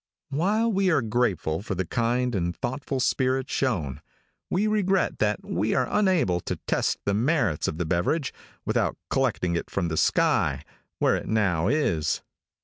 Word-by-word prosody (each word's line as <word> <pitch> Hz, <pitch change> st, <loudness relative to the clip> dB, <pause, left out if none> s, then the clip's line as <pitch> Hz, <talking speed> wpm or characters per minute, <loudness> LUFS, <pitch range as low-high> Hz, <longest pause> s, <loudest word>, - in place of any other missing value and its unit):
While 210 Hz, +10 st, +1 dB
we 195 Hz, -1 st, +2 dB
are 155 Hz, -7 st, +3 dB
grateful 105 Hz, -8 st, 0 dB
for 100 Hz, -2 st, -4 dB
the 95 Hz, +1 st, -1 dB
kind 120 Hz, +3 st, 0 dB
and 85 Hz, -3 st, -1 dB
thoughtful 130 Hz, +1 st, -3 dB
spirit 130 Hz, +1 st, +1 dB
shown, 85 Hz, -, -1 dB, 0.5 s
we 195 Hz, +4 st, +1 dB
regret 195 Hz, -3 st, +1 dB
that 105 Hz, -1 st, 0 dB
we 100 Hz, +6 st, 0 dB
were 130 Hz, -1 st, +2 dB
unable 180 Hz, -, +2 dB
to -, -, -3 dB
test -, -, +1 dB
the 100 Hz, -, +1 dB
merits 115 Hz, -, +1 dB
of 80 Hz, -, -3 dB
the 90 Hz, -, -1 dB
beverage 95 Hz, -, 0 dB, 0.3 s
without -, -, 0 dB
collecting 115 Hz, -10 st, +1 dB
it 85 Hz, -, -3 dB
from 85 Hz, -4 st, -1 dB
the 80 Hz, -, -2 dB
sky, -, -, +2 dB, 0.3 s
where -, -, +3 dB
it -, -, -4 dB
now 95 Hz, -6 st, +1 dB
is. 115 Hz, -, +1 dB
120 Hz, 160 wpm, -26 LUFS, 90-145 Hz, 0.5 s, are